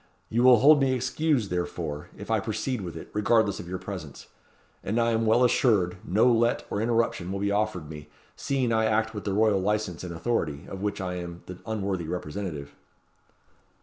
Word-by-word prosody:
You 115 - +1
will 125 -1 +8
hold 145 +5 +6
me 135 -1 +3
excused, 130 - 0
therefore, 85 -4 -3
if - - -7
I - - +3
proceed 125 -5 -2
with 85 -3 -6
it, - - -10
regardless 105 0 +2
of 85 - -8
your 95 - -3
presence; 90 -8 -8 0.6
and 110 +5 0
I 115 0 +2
am 115 0 +1
well 115 +3 +4
assured 105 -8 +3
no 105 +6 +2
let 120 -1 +3
or 100 - -1
interruption 115 -6 0
will 100 - -2
be 100 0 0
offered 100 -6 -1
me, 75 -1 -10 0.3
seeing 130 -4 0
I 110 0 +2
act 110 +1 +1
with 105 - -6
the 100 - -1
royal 105 -1 +3
licence 105 -3 -1
and 90 - -5
authority, 85 -5 -2
of 95 - -7
which 105 0 -2
I 90 -1 -3
am 85 -1 -7
the 90 0 -9
unworthy 100 -6 -2
representative." 80 -3 -5
105 Hz, 190 wpm, -27 LUFS, 90-115 Hz, 0.6 s, will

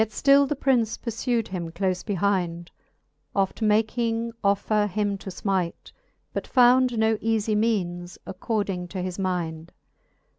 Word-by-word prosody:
Yet 220 - +1
ftill 275 +4 +4
the 295 - 0
Prince 250 -5 +1
purfewd 230 0 -2
him 175 -3 -4
clofe 185 +2 -2
behind, 180 -4 -1 0.6
Oft 195 +2 0
making 225 +2 +1
offer 205 +1 +2
him 205 0 -1
to 195 - -7
fmite, 185 -2 -2 0.4
but - - -4
found 250 -1 +4
No 220 0 +2
eafie 220 -1 0
meanes 180 -5 -1
according 195 -2 -3
to 185 0 -5
his 185 +1 -5
mind. 170 -3 -3
205 Hz, 135 wpm, -25 LUFS, 185-225 Hz, 0.6 s, ftill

